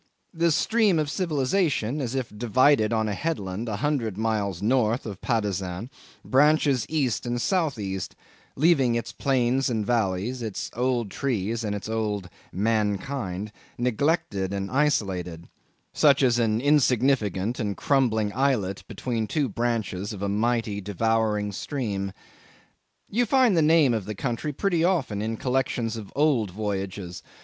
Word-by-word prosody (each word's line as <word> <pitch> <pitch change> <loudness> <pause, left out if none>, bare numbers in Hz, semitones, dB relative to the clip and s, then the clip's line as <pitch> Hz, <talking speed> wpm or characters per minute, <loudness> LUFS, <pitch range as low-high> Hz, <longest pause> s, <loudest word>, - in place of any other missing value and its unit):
The 170 0 +2
stream 215 +2 +3
of 150 -2 0
civilisation, 150 - 0
as 125 -1 -3
if 125 -5 -3
divided 120 +1 +3
on 110 -1 +1
a 105 - -1
headland 110 - -3
a 105 - -2
hundred 115 -5 -1
miles 105 -5 -1
north 115 +2 +1
of 100 -4 -7
Patusan, 100 -1 -2 0.3
branches 145 -2 +3
east 135 -7 0
and 120 0 -1
south 160 - 0
east, 95 -3 -4 0.4
leaving 135 -5 +3
its 115 - -3
plains 130 -1 +1
and 110 -3 -1
valleys, 115 +2 0
its 110 -4 -4
old 120 -4 0
trees 115 -4 -2
and 105 -1 -2
its 100 - -6
old 105 -4 -2 0.2
mankind, 105 0 -1 0.3
neglected 120 - 0
and 100 0 -3
isolated, 95 - 0 0.5
such 140 -2 +4
as 120 -2 +3
an 110 -1 +1
insignificant 125 -6 +2
and 105 -4 -2
crumbling 110 -7 +1
islet 115 -7 0
between 115 -3 -3
the - - -9
two 145 -3 +1
branches 110 -3 -2
of 100 -1 -6
a - - 0
mighty, 110 0 0
devouring 105 +1 0
stream. 100 -4 -3 1.0
You 240 +3 0
find 255 -4 +4
the 165 - +4
name 155 -4 +5
of 110 -4 -2
the 105 +1 -5
country 120 +7 -2
pretty 170 +2 0
often 145 - +1
in 110 +1 -2
collections 125 -3 -1
of 110 -3 -8
old 140 -8 +2
voyages. 95 -2 -4
115 Hz, 145 wpm, -25 LUFS, 105-135 Hz, 1.0 s, name